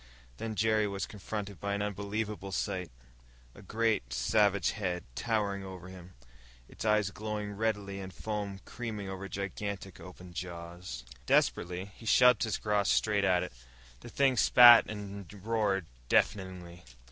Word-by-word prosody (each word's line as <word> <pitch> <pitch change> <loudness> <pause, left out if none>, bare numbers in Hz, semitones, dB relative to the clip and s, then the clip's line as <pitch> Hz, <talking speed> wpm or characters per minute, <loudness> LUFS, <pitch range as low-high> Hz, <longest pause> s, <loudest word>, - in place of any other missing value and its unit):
Then 110 -1 -4
Jerry 110 0 +2
was 100 -1 -3
confronted 100 -2 -6
by 100 0 -2
an 100 - -1
unbelievable 105 0 -3
sight 95 -2 -2 0.6
a - - -14
great, 105 - 0
savage 100 - +2
head, 90 -5 -3
towering 100 - -1
over 95 -1 -9
him, 90 -1 -12 0.5
its - - -9
eyes 105 -2 +2
glowing 105 0 -4
redly 100 -2 -2
and 95 -1 -7
foam 100 0 -4
creaming 110 -5 -5
over 95 +1 -6
gigantic, 100 0 -5
open 90 -1 -11
jaws. 85 -6 -7 0.2
Desperately, 90 +2 +2
he 115 - -11
shoved 125 +1 +6
his 110 -3 0
cross 105 -2 +1
straight 105 -2 +2
at 90 -2 +3
it. - - -7 0.5
The - - -11
thing 135 -2 +2
spat 120 +2 +8
and 100 -3 -7
roared 105 -5 +1 0.2
deafeningly. 90 -3 0
100 Hz, 140 wpm, -31 LUFS, 95-105 Hz, 0.6 s, spat